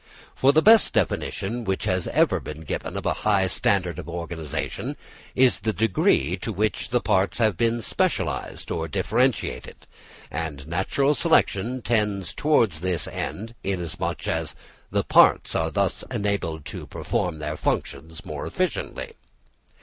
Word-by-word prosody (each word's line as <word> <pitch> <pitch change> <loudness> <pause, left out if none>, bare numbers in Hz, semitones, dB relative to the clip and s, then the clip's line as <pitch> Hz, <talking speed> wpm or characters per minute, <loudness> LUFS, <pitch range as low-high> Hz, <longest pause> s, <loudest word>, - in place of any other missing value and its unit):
For 135 - +4
the 155 +2 +3
best 220 0 +7
definition 115 +5 -1
which 95 -3 -1
has 95 -3 0
ever - - +2
been 75 +1 -8
given 80 - -4
of - - -5
a - - +2
high 100 -3 +3
standard 90 -2 +1
of - - -7
organisation, 85 -3 -4 0.4
is 130 -1 +4
the 110 +1 -1
degree 100 -4 +2
to 105 - -4
which 105 +2 -1
the 120 0 +1
parts 95 -1 +1
have 110 -5 +2
been 115 +4 0
specialised - - -2
or 80 -1 -2
differentiated; 120 - -1 0.5
and 75 -3 -4
natural 95 - +1
selection 125 - +1
tends 105 -5 0
towards 115 - +2
this 90 -1 -1
end, 115 +3 -5
inasmuch 90 -5 -3
as - - -2 0.3
the - - 0
parts - - +5
are 80 0 +1
thus 100 +2 -1
enabled 100 - -2
to - - -7
perform 90 -3 -2
their 75 - -4
functions 80 +2 -3
more - - -5
efficiently. - - -3
100 Hz, 140 wpm, -24 LUFS, 85-115 Hz, 0.5 s, best